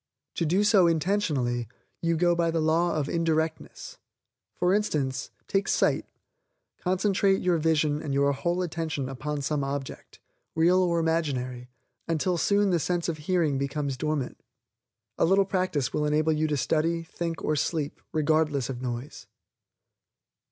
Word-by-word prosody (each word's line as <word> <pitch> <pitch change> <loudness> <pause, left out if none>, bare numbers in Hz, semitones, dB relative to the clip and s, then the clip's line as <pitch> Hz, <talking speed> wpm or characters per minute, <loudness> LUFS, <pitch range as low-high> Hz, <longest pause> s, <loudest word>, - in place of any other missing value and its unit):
To 165 - +1
do 185 +6 +2
so 205 -4 +5
intentionally, 150 - 0 0.3
you 165 -1 +1
go 175 +1 +3
by 170 -1 +1
the 165 0 0
law 165 +2 +2
of 150 -3 -1
indirectness. 160 -1 -2 0.6
For 180 +1 +2
instance, 150 -11 -1 0.2
take 195 0 0
sight; - - +1 0.7
concentrate 195 +1 +2
your 180 -2 +2
vision 155 -2 +1
and 145 - -4
your 140 +1 +3
whole 175 +6 -1
attention 160 -5 -3
upon 140 +2 -4
some 145 0 -1
object, 135 0 -6 0.4
real 175 +3 +4
or 175 -2 +2
imaginary, 130 -7 -1 0.4
until 170 +2 0
soon 200 +1 +2
the 175 - +2
sense 175 +1 -1
of 160 -2 -3
HEARING 155 -4 +1
becomes 140 0 -2
dormant. 150 -1 -2 0.8
A - - +4
little 195 +3 +4
practice 185 - -1
will 150 - 0
enable 155 +1 +2
you 155 +1 +1
to 150 -1 0
study, 165 +4 0
think 165 0 -5
or 155 - +1
sleep, 150 0 -2
regardless 155 -4 +1
of 125 -1 -7
noise. 125 +2 -6
160 Hz, 145 wpm, -27 LUFS, 145-175 Hz, 0.8 s, so